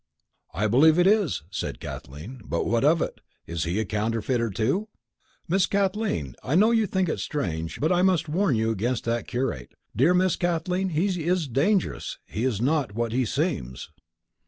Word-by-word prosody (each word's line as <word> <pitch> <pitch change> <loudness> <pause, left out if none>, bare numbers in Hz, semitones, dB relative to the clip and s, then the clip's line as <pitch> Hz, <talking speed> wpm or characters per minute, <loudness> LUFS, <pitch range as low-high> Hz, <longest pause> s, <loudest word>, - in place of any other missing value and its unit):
"I 100 +6 -1
believe 145 +9 +5
it 175 - +4
is," 200 - +2
said 90 - -4
Kathleen, 80 - -8
"but 85 - -2
what 115 +2 +1
of 155 +3 +4
it? - - -6 0.2
Is 85 -1 -3
he 85 +5 -1
a 110 - 0
counterfeiter, 115 +3 -1
too?" 130 - 0 0.6
"Miss 185 +2 +2
Kathleen, 195 - -1
I 140 - 0
know 215 +6 +5
you 225 -2 +2
think 190 0 0
it - - -2
strange, 85 - -3
but 155 +6 +1
I 180 0 +3
must 185 -4 +2
warn 160 -2 +1
you 110 +1 +1
against 115 +3 -1
that 115 0 -2
curate. 120 - -3 0.2
Dear 155 +9 +4
Miss 185 0 +3
Kathleen, 180 +2 0
he 175 +1 0
is 175 -3 +1
dangerous. 140 - 0
He 115 - -3
is 120 -6 0
not 135 -4 0
what 115 0 -1
he 125 +2 +1
seems." 65 - -3
135 Hz, 180 wpm, -25 LUFS, 110-180 Hz, 0.6 s, believe